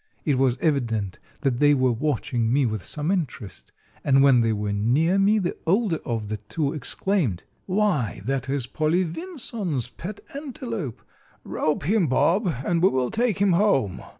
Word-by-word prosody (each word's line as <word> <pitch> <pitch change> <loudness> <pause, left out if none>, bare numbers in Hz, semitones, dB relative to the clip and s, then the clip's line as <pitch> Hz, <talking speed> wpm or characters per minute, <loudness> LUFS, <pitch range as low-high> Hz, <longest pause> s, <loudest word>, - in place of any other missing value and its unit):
It 140 -4 +2
was 130 -2 +2
evident 115 - 0 0.2
that 130 -4 0
they 145 0 +5
were 130 -2 +2
watching 120 -3 -1
me 135 +1 +3
with 110 -4 -2
some 150 +3 -2
interest, 140 - -4 0.3
and 135 -1 +4
when 135 -4 +6
they 115 -1 +2
were 105 -1 -2
near 140 - +2
me 205 +2 +4
the 185 -4 -1
older 190 -2 +2
of 115 -3 -3
the 110 +1 -3
two 140 +8 -3
exclaimed, 150 - -1 0.2
"Why, 185 - 0
that 135 0 -2
is 135 -3 -1
Polly 155 +7 +1
Vinson's 195 - -4
pet 195 - -8
antelope. 235 - -5 0.4
Rope 155 - -1
him, 190 +2 +2
Bob, 175 - +2 0.2
and 170 -1 +1
we 190 - +6
will 130 -5 0
take 230 -4 +1
him 195 -2 +3
home!" 155 - +2
145 Hz, 165 wpm, -24 LUFS, 120-190 Hz, 0.4 s, when